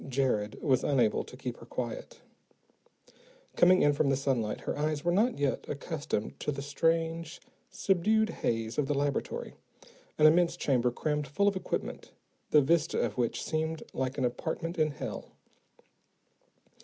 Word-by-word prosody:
_" - - -9
Jared 125 -6 0
was 130 -4 +3
unable 120 -6 +2
to 125 - -12
keep 125 -2 -5
her - - -12
quiet. 120 -1 -5 1.3
Coming 185 +1 +6
in 145 - +5
from 140 0 +1
the 135 - +3
sunlight, 130 -6 -1
her - - -3
eyes 150 +1 -1
were 175 - +3
not 220 +7 +2
yet 140 -2 0
accustomed 145 -7 -3
to - - -1
the 140 -1 -5
strange, 165 +2 0 0.3
subdued 215 +4 +2
haze 115 +2 -1
of 140 - +1
the 145 - 0
laboratory, 140 0 -2 0.6
an 150 - +5
immense 170 +2 +5
chamber 125 -6 +2
crammed 150 +4 -2
full 200 +9 +1
of 200 - +2
equipment, 185 - -4 0.4
the 150 - +6
vista 165 +2 +2
of 115 -3 -1
which 120 -2 0
seemed 160 0 -2
like 130 +1 -2
an 130 - +1
apartment 160 +7 -3
in 155 -1 +3
hell. 145 - -6
145 Hz, 155 wpm, -30 LUFS, 130-165 Hz, 1.3 s, Coming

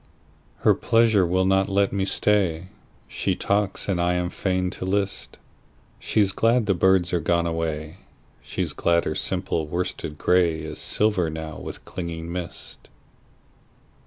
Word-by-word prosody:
Her - - +5
pleasure 115 -5 +3
will 95 +2 +2
not 95 +1 +2
let 100 0 +2
me 95 -1 0
stay. 95 -4 +1 0.4
She - - -1
talks 100 -1 -1
and 90 -3 0
I 90 +1 +2
am 90 0 -1
fain 90 -1 -1
to - - -7
list:She's 100 +1 -3
glad 115 +3 +2
the 100 - +2
birds 95 0 +3
are 90 - +2
gone 85 +1 +1
away, 80 -1 -3 0.4
She's - - -3
glad 85 0 +2
her - - -1
simple 90 -4 -2
worsted 80 -2 -3
grayIs 80 -3 +1
silver 105 -6 +1
now 80 0 -6
with - - -8
clinging 85 -1 -5
mist. 90 -1 -7
90 Hz, 135 wpm, -24 LUFS, 85-95 Hz, 0.4 s, Her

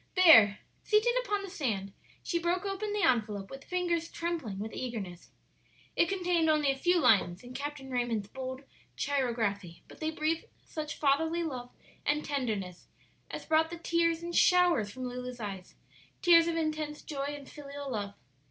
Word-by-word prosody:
There, 225 - +8 0.3
seated 430 +3 +3
upon 410 -4 -1
the 390 - -6
sand, 210 - -2 0.3
she 340 - -1
broke 350 +3 0
open 400 +2 -2
the 415 -1 0
envelope 210 -5 +1
with 270 0 -9
fingers 345 -2 -1
trembling 330 - -3
with 215 +3 -5
eagerness. 205 -9 -5 0.7
It 340 - +3
contained 355 -4 +1
only 300 -3 +3
a - - -2
few 350 +6 +2
lines 200 - +3
in 245 +1 -10
Captain 280 -1 -5
Raymond's 240 -5 -1
bold 260 +3 -6 0.3
chirography, 225 -10 -1
but - - -14
they 315 - -1
breathed 320 +1 -1 0.2
such 305 -1 -5
fatherly 320 +4 +2
love 255 -6 -5 0.3
and 300 +1 0
tenderness 215 -11 -3 0.4
as - - -6
brought 320 0 +3
the 340 - -6
tears 335 0 +1
in 345 - -4
showers 350 - +4
from 255 +5 -7
Lulu's 250 0 -6
eyes 195 -4 -6 0.5
tears 335 -2 +7
of 335 - 0
intense 310 -2 -2
joy 285 -1 -3
and 280 - -12
filial 285 -1 -7
love. 205 -3 -3
285 Hz, 160 wpm, -31 LUFS, 235-335 Hz, 0.7 s, There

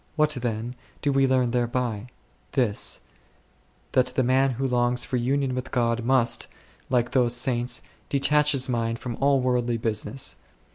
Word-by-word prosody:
What, 155 -1 +3
then, 120 -3 -3 0.3
do 145 - +2
we 135 0 +3
learn 130 -2 +2
there 120 -1 +1
by? 120 -2 -2 0.5
This: 120 -7 0 0.9
that 125 -1 +3
the 125 +1 +1
man 130 +2 +3
who 135 +3 -1
longs 125 0 +1
for 130 - -2
union 135 +2 0
with 130 +1 -4
God 120 -1 0
must, 125 -1 +2 0.4
like 120 -2 +1
those 120 -2 +2
saints, 120 -1 0 0.3
detach 150 +2 +3
his 130 -2 +2
^ - - -9
mind 115 -1 -1
from 120 -1 -5
all 140 -1 +3
worldly 120 -2 0
business. 115 +4 -2
125 Hz, 160 wpm, -25 LUFS, 120-135 Hz, 0.9 s, What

